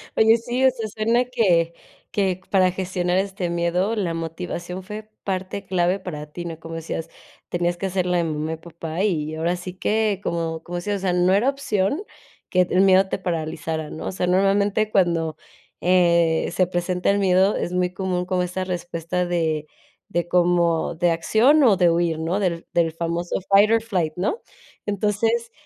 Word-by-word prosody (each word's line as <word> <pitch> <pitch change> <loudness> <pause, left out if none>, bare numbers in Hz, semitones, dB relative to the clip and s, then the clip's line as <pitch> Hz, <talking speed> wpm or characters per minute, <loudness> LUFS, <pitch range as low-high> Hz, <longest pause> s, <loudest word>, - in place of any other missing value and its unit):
¡Oye!, 220 +1 +5
sí, 240 +2 -2
o - - +8
sea, 230 -3 -5
suena 225 +4 +1
que 175 -9 +2 0.4
que 190 -3 0
para 185 -2 +4
gestionar 180 -1 -1
este 190 -2 -1
miedo, 170 +5 0
la 185 -6 -1
motivación 175 +2 -5
fue 215 +3 -8
parte 190 +1 -3
clave 180 +1 +1
para 150 -6 -6
ti, 175 +2 -6
¿no? 165 -2 -6
Como 165 0 -8
decías: 165 0 -5 0.4
"Tenías 175 0 0
que 195 - -2
hacer 185 -1 -1
la 180 0 +1
de 170 - +2
mamá 155 0 -2
y - - -5
papá"; 165 +1 -5
y 155 -7 0
ahora 165 +3 0
sí 180 +1 -7
que, 210 +1 0
como 165 -1 -2
como 175 - -7
decías, 200 +4 -2
o - - -7
sea, 185 -2 0
"No 180 +1 +3
era 215 +7 +3
opción 275 - -1 0.5
que 185 - +3
el 185 - +3
miedo 190 0 +5
te - - -1
paralizara", 160 -3 -3
¿no? - - -7
O - - -2
sea, 180 -1 -2
normalmente 200 +3 +2
cuando, 165 -5 +1 0.4
eh, 170 -2 +3
se 180 +1 +2
presenta 180 0 -1
el 200 - +3
miedo, 190 +1 +3
es 175 - -3
muy 180 0 0
común 185 -2 -2
como 180 0 0
esa 180 +1 -3
respuesta 175 -1 -3
de 160 -3 -1 0.4
de, 175 0 -1
como 175 -2 +2
de 175 +1 +2
acción 225 - +4
o 225 -6 +6
de 175 -2 +4
huir, 165 -1 +1
¿no?, 165 +5 -1
del 175 -4 -1
del 165 -2 +2
famoso 170 +2 -2
fight 200 +2 +6
or 225 0 +4
flight, 180 -8 -1
¿no? 200 - -1 0.5
Entonces, 215 +3 0
180 Hz, 185 wpm, -23 LUFS, 170-195 Hz, 0.5 s, o